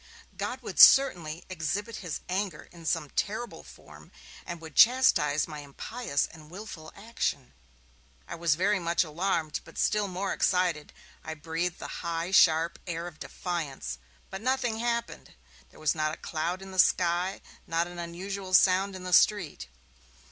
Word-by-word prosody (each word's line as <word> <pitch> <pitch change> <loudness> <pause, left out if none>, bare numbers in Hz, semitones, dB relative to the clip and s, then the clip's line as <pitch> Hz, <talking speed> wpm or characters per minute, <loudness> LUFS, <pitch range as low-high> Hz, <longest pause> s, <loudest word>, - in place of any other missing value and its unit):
God - - -4
would - - -6
certainly 175 - +6
exhibit 195 +6 -3
his 175 -5 -5
anger 185 -3 -3
in 170 -2 -10
some 155 -4 -1
terrible 220 +4 -3
form, - - -15 0.4
and 175 -1 -5
would 160 -3 -11
chastise 155 - +5
my 155 -2 -7
impious 145 - -3
and 155 -2 -14
willful 175 -4 -9
action. 205 - -3 0.7
I - - -6
was 170 -2 +1
very 195 +4 +2
much 170 0 +1
alarmed, 165 -1 -1
but - - -15
still 210 -1 +1
more 190 +1 -2
excited; 180 -5 +1 0.3
I 160 - -5
breathed 165 +3 -3
the - - -7
high, 170 +1 -3
sharp 165 -3 +4
air 170 -1 -3
of 170 -3 -9
defiance. 155 - -4 0.3
But 190 +1 -6
nothing 250 -2 0
happened; 235 -1 -3 0.3
there - - -18
was 155 -1 +2
not 155 -1 -1
a - - -20
cloud 170 +4 -3
in 195 - -10
the 185 - -4
sky, 180 +2 +3 0.3
not 165 +1 +1
an 175 0 -9
unusual 185 +3 -3
sound 190 +2 +4
in 185 - -8
the 180 0 -4
street. 180 - +3
175 Hz, 155 wpm, -28 LUFS, 160-195 Hz, 0.7 s, certainly